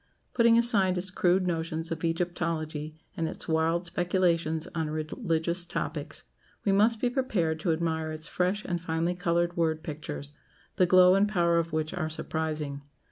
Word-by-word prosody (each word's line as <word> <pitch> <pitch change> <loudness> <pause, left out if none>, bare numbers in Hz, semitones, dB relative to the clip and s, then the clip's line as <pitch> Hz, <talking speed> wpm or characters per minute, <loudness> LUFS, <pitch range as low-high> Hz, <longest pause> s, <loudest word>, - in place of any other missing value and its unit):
Putting 235 -2 +5
aside 200 -6 +3
its 185 +1 0
crude 185 0 +2
notions 165 -1 -2
of 160 0 -4
Egyptology, 165 -2 -2 0.2
and 165 - -1
its - - -4
wild 165 +2 +1
speculations 170 -2 0
on 160 -2 -2
religious 165 +2 -2
topics, - - -4 0.4
we 200 - +3
must 215 +3 +3
be 250 - +1
prepared 210 - 0
to 170 - 0
admire 160 -1 -1
its 155 0 -5
fresh 185 +6 -1
and 175 -2 -2
finely 165 +1 -1
coloured 175 0 0
word 160 -2 0
pictures, 75 - -6 0.4
the 180 - +4
glow 185 0 +7
and 200 +2 +3
power 170 -4 +2
of 165 0 -2
which 155 +1 -2
are 170 -4 -2
surprising. 155 -3 -3
170 Hz, 160 wpm, -28 LUFS, 160-180 Hz, 0.4 s, glow